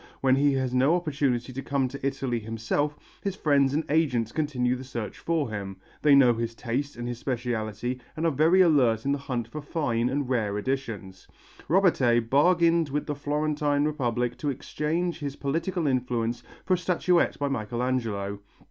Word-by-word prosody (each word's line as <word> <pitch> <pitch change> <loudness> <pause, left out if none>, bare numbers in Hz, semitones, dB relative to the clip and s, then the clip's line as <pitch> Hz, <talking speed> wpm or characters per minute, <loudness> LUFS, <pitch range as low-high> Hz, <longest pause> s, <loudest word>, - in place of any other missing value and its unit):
When 130 -1 +4
he 140 +1 +3
has 130 -2 -1
no 135 +6 +4
opportunity 140 -7 -1
to 135 - -4
come 135 -1 0
to 140 +1 -9
Italy 135 -3 -1
himself, 115 +7 -2 0.2
his 195 -2 -2
friends 140 -5 +3
and 155 - +1
agents 135 -8 +1
continue 130 -5 0
the 130 - -7
search 120 -4 -6
for 160 -8 -1
him; 100 -2 -5 0.2
they 145 -2 +6
know 130 -3 +6
his 115 0 -3
taste 130 +5 -3
and 120 0 -5
his 120 -1 -4
speciality 120 -1 -3 0.2
and 160 - -1
are 165 - +3
very 160 +6 +4
alert 130 -10 +3
in 140 - +1
the 140 - 0
hunt 125 -4 -3
for 150 +6 -7
fine 125 -6 -1
and 140 0 -1
rare 110 -5 0
editions. 105 -6 -4 0.4
Robertet 125 - +3
bargained 165 +2 +4
with 145 +2 -2
the 150 - -2
Florentine 145 0 0
Republic 125 -5 -1
to 150 - -1
exchange 165 +6 -2
his 140 -2 -4
political 165 +5 -2
influence 120 -3 0 0.2
for 185 - +2
a - - +3
statuette 180 -1 +2
by 145 - -1
Michelangelo. 115 -5 -2
135 Hz, 175 wpm, -27 LUFS, 120-150 Hz, 0.4 s, they